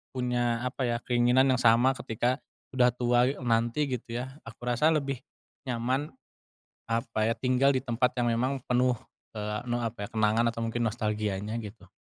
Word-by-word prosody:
punya 120 -1 0
apa 125 0 -2
ya, 120 0 0
keinginan 125 +2 +3
yang 130 - +2
sama 120 +2 +5
ketika 125 0 -1 0.4
udah 125 -1 +5
tua 120 +1 +2
e 145 - -9
nanti 120 +3 +1
gitu 120 -2 -4
ya, 130 +2 -6
aku 115 +2 -10
rasa 125 +6 +3
lebih 140 -5 -1 0.4
nyaman 130 +3 -1 0.8
apa 115 -1 -1
ya, 115 - +1
tinggal 130 +3 +2
di 130 - 0
tempat 125 0 0
yang 120 -1 +1
memang 130 +3 0
penuh, 125 0 +2 0.4
eee, 105 0 -3
ne 120 0 0
apa 110 -3 -3
ya, - - -14
kenangan 110 +1 +3
atau 115 0 -5
mungkin 115 +1 -1
nostalgianya 105 -1 -2
gitu. 105 -3 -9
120 Hz, 170 wpm, -28 LUFS, 115-130 Hz, 0.8 s, sama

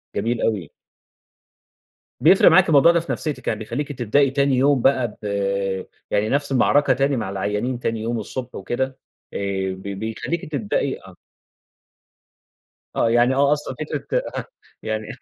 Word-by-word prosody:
جميل 115 +3 -1
أوي. 100 -8 -1 1.5
بيفرِق - - +6
معاكِ - - +5
الموضوع 150 +2 +6
ده 170 - +2
في 165 - -5
نفسيتِك، 145 -6 -4
يعني 110 - 0
بيخلّيكِ 130 +7 -4
تبدئي 130 +2 +2
تاني 140 -1 +2
يوم 135 0 +3
بقى 130 -5 +2
ب - - -9 0.9
يعني 105 +1 +1
نفْس 145 +2 0
المعركة 140 +2 +3
تاني 135 +1 +1
مع 105 - -3
العيانين 105 +6 -2
تاني 115 -2 -2
يوم 115 +1 -2
الصبح 125 +3 -6
وكده 120 +7 -1 0.5
آآ، - - -3 0.4
ب 95 - -11
بيخلّيكِ 110 - -4
تبدئي 120 -9 -1
آه. - - -15 1.8
آه، 115 - +2
يعني 120 +2 +4
آه، 140 +1 +4
أصلًا 145 -3 -4
فكرة 155 - -2 0.2
أها - - -3 0.4
يعني 110 0 -3
125 Hz, 145 wpm, -22 LUFS, 110-140 Hz, 1.8 s, بيفرِق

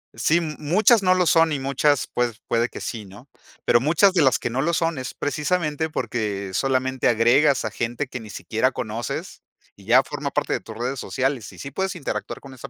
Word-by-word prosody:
Sí, 165 +2 +2
muchas 175 +8 +2
no 185 - +5
lo 180 -2 +2
son 165 -1 +4
y 145 - -1
muchas, 140 +1 +1
pued 120 -1 -1 0.2
puede 115 +1 +1
que - - -9
sí, 110 -3 -5
¿no? 105 +8 -15 0.3
Pero, 120 - +4
muchas 170 +8 +4
de 175 -5 +3
las 130 - +3
que 120 - -3
no 130 +3 -1
lo 170 +2 0
son, 165 -2 0
es 130 -1 -5
precisamente 150 +1 -1
porque, 105 -7 -3
solamente 130 0 0
agregas 125 +5 +4
a - - -2
gente 120 +4 -3
que 125 - -6
ni 110 -3 -10
siquiera - - -1
conoces - - -5 0.3
y 100 - -18
ya 125 +5 +6
forma 145 -1 -5
parte - - -1
de - - -1
tus 110 - -10
redes 125 +3 -3
sociales. 130 -5 -2
Y 90 - -15
sí 140 - -6
puedes 190 +6 -3
interactuar 150 - -4
con 135 -2 -12
esa - - -9
135 Hz, 215 wpm, -23 LUFS, 120-155 Hz, 0.3 s, ya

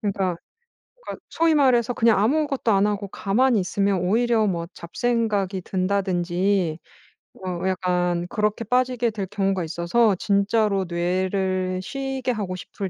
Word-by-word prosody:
그니까 195 -4 -1 0.7
그러니까 - - -8
소위 330 -1 +2
말해서 250 -4 +3
그냥 230 -3 +3
아무것도 275 +1 +1
안 195 +1 +3
하고 205 -1 -2
가만히 220 +5 +1
있으면 195 +1 0
오히려 225 +4 +2
뭐 170 -3 -2
잡생각이 205 0 -1
든다든지 185 -2 0 0.7
어 180 0 -3
약간 180 -2 0
그렇게 210 +1 -1
빠지게 250 +1 +1
될 210 -3 -4
경우가 195 -3 -1
있어서 170 +7 +1
진짜로 200 0 +1
뇌를 185 +1 -1
쉬게 270 +1 -3
하고 200 -5 -3
싶을 190 +1 -6
200 Hz, 305 characters per minute, -23 LUFS, 185-230 Hz, 0.7 s, 말해서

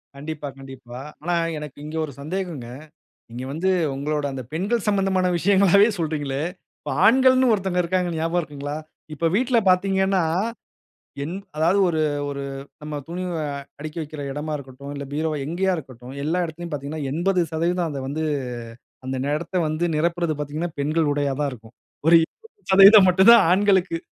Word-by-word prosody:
கண்டிப்பா, 150 +1 -6
கண்டிப்பா. 130 -2 -10 0.2
ஆனா 175 +3 0 0.2
எனக்கு 150 -2 -8
இங்க 155 +1 -7
ஒரு 150 - -9
சந்தேகங்க. 165 -5 -4 0.6
நீங்க 120 +2 -6
வந்து 175 +6 0 0.2
உங்களோட 150 +2 -2
அந்த 130 -1 -5
பெண்கள் 200 +7 -1
சம்மந்தமான 195 -2 +2
விஷயங்களாகவே 200 +2 +5
சொல்கிறீங்களே! 145 -4 -2 0.4
இப்ப 150 - -6
ஆண்கள்னு 260 +2 +5
ஒருத்தங்க 190 -3 0
இருக்காங்க, 180 +1 0
ஞாபகம் 165 +2 0
இருக்குங்களா? 145 -1 -6 0.4
இப்ப 165 +3 -1
வீட்ல 245 +2 +3
பார்த்தீங்கன்னா, 190 0 +2 1.0
என் 165 +5 -5 0.2
அதாவது 170 +6 +3
ஒரு, 160 -2 0 0.3
ஒரு 140 -1 -4 0.4
நம்ம 150 -1 -5
துணி 175 +2 -4 0.2
அ - - -2 0.3
அடிக்கி 155 +2 -7
வைக்கிற 155 0 -8
இடமா 150 +2 -4
இருக்கட்டும், 140 0 -9
இல்ல 140 0 -5
பீரோவ 155 +1 -1
எங்கேயா 185 +5 0
இருக்கட்டும். 130 -4 -10
எல்லா 165 +4 0
இடத்திலயும் 170 +1 -7
பார்த்தீங்கன்னா, 145 +2 -4
80% 170 0 0
அத 140 -2 -5
வந்து 155 +3 -2 0.8
அந்த 130 0 -2 0.2
இடத்த 170 +4 -5
வந்து 155 +3 -1
நிரப்புறது 170 +1 0
பார்த்தீங்கன்னா, 150 +4 -3
பெண்கள் 155 +1 +1
உடையா 145 -1 0
தான் 145 -1 0
இருக்கும். 115 -1 -13 0.3
ஒரு 170 - +7
20% 200 - +5
மட்டும் 190 +4 +6
தான் 235 - +7
ஆண்களுக்கு. 190 -3 +2
160 Hz, 145 wpm, -23 LUFS, 145-185 Hz, 1.0 s, ஒரு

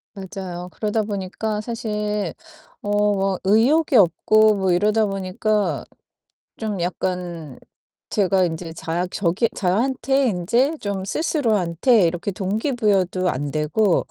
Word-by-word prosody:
맞아요. 185 -2 -7
그러다 215 0 -1
보니까 210 +1 -3
사실 210 -4 -3 0.5
어 205 0 +1
막 195 -1 0
의욕이 255 +9 +3
없고 215 +3 +4
뭐 190 -2 0
이러다 210 +5 +2
보니까 195 +2 -1 0.7
좀 210 -4 -3
약간 175 -5 -4 0.5
제가 190 -2 +2
인제 165 0 -5
자 170 +2 -3
저기 195 +5 0
저한테 260 +7 +1
이제 235 - +1
좀 200 -2 -3
스스로한테 220 - +2
이렇게 175 +4 -3
동기부여도 195 -3 0
안되고, 150 +8 +1
200 Hz, 245 characters per minute, -22 LUFS, 180-215 Hz, 0.7 s, 없고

